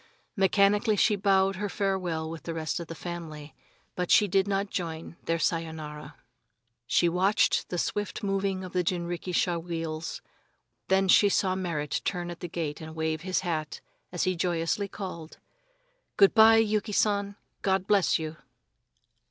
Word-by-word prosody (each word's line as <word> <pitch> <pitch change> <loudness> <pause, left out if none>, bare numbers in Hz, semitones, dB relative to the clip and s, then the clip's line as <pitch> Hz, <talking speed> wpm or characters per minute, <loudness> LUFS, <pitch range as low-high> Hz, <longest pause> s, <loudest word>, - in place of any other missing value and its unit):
Mechanically 200 +2 +3
she 210 +2 +3
bowed 195 -1 +2
her 205 +1 -2
farewell 185 -6 -1
with 160 0 -7
the 165 - -5
rest 160 +1 -2
of 170 - -6
the 165 - -7
family, 160 -3 -7 0.4
but 180 -1 -2
she 210 - +5
did 195 +1 +2
not 200 0 -1
join 165 -2 -4
their 165 - +1
"Sayonara." 155 -3 -3 0.7
She 175 - +3
watched 185 +5 +2
the 180 - -3
swift 205 +5 -2
moving 195 -1 -1
of 185 - -8
the 180 -1 +1
jinrikisha 175 0 -1
wheels, 165 -1 -5 0.6
then 190 0 +3
she 200 +2 +6
saw 190 -1 +1
Merrit 170 -6 -2
turn 175 -2 -2
at 170 - -9
the 175 - -5
gate 160 -3 -4
and 160 0 -8
wave 160 -1 -1
his 185 +1 -1
hat 155 -5 -3 0.3
as 175 - -1
he 185 -1 +1
joyously 175 +3 -1
called: 175 -5 -8 0.8
"Good 195 -1 +6
by, 225 0 +8
Yuki 215 -1 +1
San, 200 -1 +1 0.3
God 190 -1 +1
bless 200 -3 +3
you!" 155 0 -6
180 Hz, 155 wpm, -28 LUFS, 165-195 Hz, 0.8 s, by